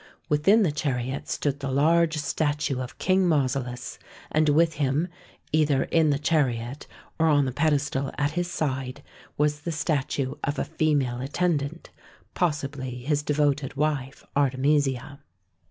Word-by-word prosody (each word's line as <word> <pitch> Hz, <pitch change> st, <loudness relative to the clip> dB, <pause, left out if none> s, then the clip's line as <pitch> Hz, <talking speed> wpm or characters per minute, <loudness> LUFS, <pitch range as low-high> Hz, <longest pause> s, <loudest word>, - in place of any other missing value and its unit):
Within 195 Hz, +10 st, +4 dB
the 170 Hz, -, +2 dB
chariot 135 Hz, -3 st, -2 dB
stood 145 Hz, -1 st, -1 dB
the 140 Hz, -1 st, -3 dB
large 160 Hz, +3 st, +3 dB
statue 145 Hz, -2 st, -1 dB
of 125 Hz, -, -7 dB
King 185 Hz, -1 st, +2 dB
Mausolus, 130 Hz, -5 st, -1 dB, 0.3 s
and 155 Hz, 0 st, +3 dB
with 160 Hz, +2 st, +4 dB
him, 140 Hz, +5 st, +1 dB, 0.4 s
either 150 Hz, -3 st, +3 dB
in 160 Hz, -2 st, +2 dB
the 140 Hz, -, +2 dB
chariot, 135 Hz, -4 st, 0 dB, 0.3 s
or 160 Hz, -, +4 dB
on 145 Hz, -3 st, +4 dB
the 130 Hz, -, -1 dB
pedestal 140 Hz, -1 st, 0 dB
at 145 Hz, 0 st, +1 dB
his 175 Hz, +2 st, -2 dB
side, 135 Hz, -4 st, -3 dB, 0.3 s
was 150 Hz, 0 st, +1 dB
the 170 Hz, +3 st, -4 dB
statue 140 Hz, -4 st, -1 dB
of 145 Hz, +1 st, -1 dB
a -, -, -1 dB
female 140 Hz, -6 st, 0 dB
attendant, 150 Hz, +2 st, -1 dB, 0.4 s
possibly 140 Hz, -7 st, -2 dB
his 145 Hz, +2 st, +1 dB
de 150 Hz, 0 st, -1 dB
voted 145 Hz, -2 st, +1 dB
wife 140 Hz, -2 st, -2 dB
Artemisia. 140 Hz, 0 st, +1 dB
145 Hz, 140 wpm, -26 LUFS, 135-155 Hz, 0.4 s, Within